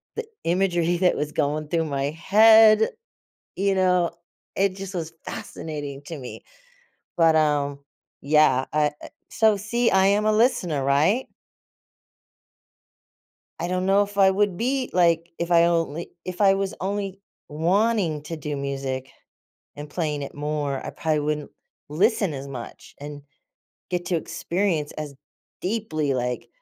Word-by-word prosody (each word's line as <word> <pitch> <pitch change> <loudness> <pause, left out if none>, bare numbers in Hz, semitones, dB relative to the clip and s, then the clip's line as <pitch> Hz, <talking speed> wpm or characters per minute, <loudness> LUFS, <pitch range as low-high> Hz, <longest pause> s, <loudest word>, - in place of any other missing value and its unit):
the 460 - -4 0.2
imagery 175 -1 +1
that 180 0 +2
was 150 0 -2
going 150 0 -1
through 165 +1 0
my 140 -2 -2
head, 215 +6 +6 0.7
you 195 +1 +1
know, 180 -2 +2 0.4
it 195 -1 +1
just 195 0 -7
was 165 -3 -4
fascinating 145 -3 -6
to 165 +1 -6
me. 125 -3 -9 0.8
But, 165 -2 +4
um, 145 -2 +1 0.4
yeah, 140 -3 +3
I, 150 -1 +3
uh - - -8 0.2
So 220 -2 +3
see, 230 +4 0
I 190 0 +4
am 205 +2 +2
a 215 - +4
listener, 215 - +2
right? 155 - +2 2.3
I 175 - -2
don't 185 +1 -1
know 195 +1 +4
if 205 0 -6
I 195 -1 +6
would 195 -1 +1
be, 255 +5 -1
like, 170 -2 +2
if 170 +1 -3
I 170 -1 +6
only 170 -1 -1
if 185 +1 -6
I 195 -1 +6
was 195 0 -2
only 195 0 -3 0.3
wanting 175 +1 +1
to 165 +2 -5
do 150 -1 -4
music 135 -1 -4 0.7
and 145 0 -8
playing 150 -4 -2
it - - -8
more, 145 -2 -3
I - - -4
probably 155 -2 -1
wouldn't 150 0 -3 0.4
listen 195 +2 +1
as 140 0 -6
much 125 -4 -9
and 145 0 -8 0.7
get 175 -1 -2
to 180 - +1
experience 170 -2 -2
as 150 -2 -7 0.5
deeply, 160 -9 -1
like, 125 -1 -3
170 Hz, 145 wpm, -24 LUFS, 150-195 Hz, 2.3 s, head